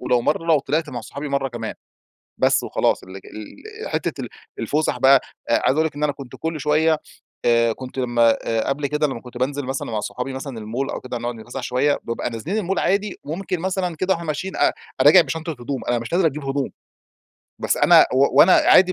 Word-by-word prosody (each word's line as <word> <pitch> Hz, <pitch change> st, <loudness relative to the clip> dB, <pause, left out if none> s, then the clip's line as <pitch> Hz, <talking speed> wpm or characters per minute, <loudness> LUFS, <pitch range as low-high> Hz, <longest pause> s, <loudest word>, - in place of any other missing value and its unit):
ولو 125 Hz, -1 st, +2 dB
مرّة 165 Hz, -, 0 dB
لو 160 Hz, -3 st, +5 dB
طلعت 155 Hz, +3 st, -1 dB
مع 120 Hz, -, -5 dB
صحابي 145 Hz, +1 st, -7 dB
مرّة 140 Hz, -1 st, 0 dB
كمان. 115 Hz, -3 st, -5 dB, 0.7 s
بس -, -, +3 dB
وخلاص، -, -, 0 dB
ال 95 Hz, +1 st, -10 dB
ال 435 Hz, -, -9 dB
حتّة -, -, -2 dB
ال -, -, -7 dB, 0.3 s
الفسح 150 Hz, -4 st, 0 dB
بقى 135 Hz, +1 st, +6 dB, 0.3 s
آآ، -, -, +3 dB
عايز -, -, +3 dB
أقول 160 Hz, 0 st, +3 dB
لِك 150 Hz, -, -11 dB
إن 145 Hz, -, -3 dB
أنا 150 Hz, -, +2 dB
كنت 135 Hz, -3 st, -10 dB
كل 160 Hz, -1 st, -4 dB
شويّة، 155 Hz, +1 st, +2 dB, 0.5 s
آآ 115 Hz, -1 st, +3 dB
كنت 130 Hz, +2 st, -10 dB
لمّا 120 Hz, -2 st, +3 dB, 0.3 s
قبل 140 Hz, +1 st, -1 dB
كده، 150 Hz, +1 st, +1 dB
لمّا 130 Hz, -5 st, -5 dB
كنت 125 Hz, -1 st, -11 dB
بانزل 140 Hz, +2 st, -1 dB
مثلًا 135 Hz, -2 st, -4 dB
مع 110 Hz, -, -1 dB
صحابي 125 Hz, +4 st, -4 dB
مثلًا 135 Hz, -2 st, -6 dB
المول 115 Hz, +5 st, -3 dB
أو -, -, -5 dB
كده 125 Hz, -1 st, -5 dB
نقعد 120 Hz, 0 st, -4 dB
نتفسح 120 Hz, +4 st, -7 dB
شويّة، 135 Hz, +4 st, +1 dB
بابقى 115 Hz, +1 st, -3 dB
نازلين 120 Hz, -, -4 dB
المول 195 Hz, -2 st, -1 dB
عادي 200 Hz, +1 st, 0 dB
وممكن 180 Hz, +3 st, -3 dB
مثلًا 185 Hz, -2 st, -1 dB
كده 185 Hz, +4 st, +1 dB
وإحنا 170 Hz, -2 st, -6 dB
ماشيين 185 Hz, +6 st, -3 dB
أ -, -, +4 dB
أ -, -, -5 dB, 0.3 s
راجع 185 Hz, -, +8 dB
بشنطة 160 Hz, +3 st, -4 dB
هدوم، 130 Hz, -1 st, -5 dB
أنا 120 Hz, -1 st, +1 dB
مش 115 Hz, +7 st, -7 dB
نازل 180 Hz, 0 st, +3 dB
أجيب 150 Hz, -2 st, -1 dB
هدوم! 135 Hz, 0 st, -1 dB, 0.9 s
بس -, -, +1 dB
أنا 170 Hz, -2 st, +7 dB
و 135 Hz, +2 st, +3 dB
وأنا 185 Hz, -, +7 dB
عادي 185 Hz, 0 st, +6 dB
140 Hz, 210 wpm, -22 LUFS, 125-160 Hz, 0.9 s, راجع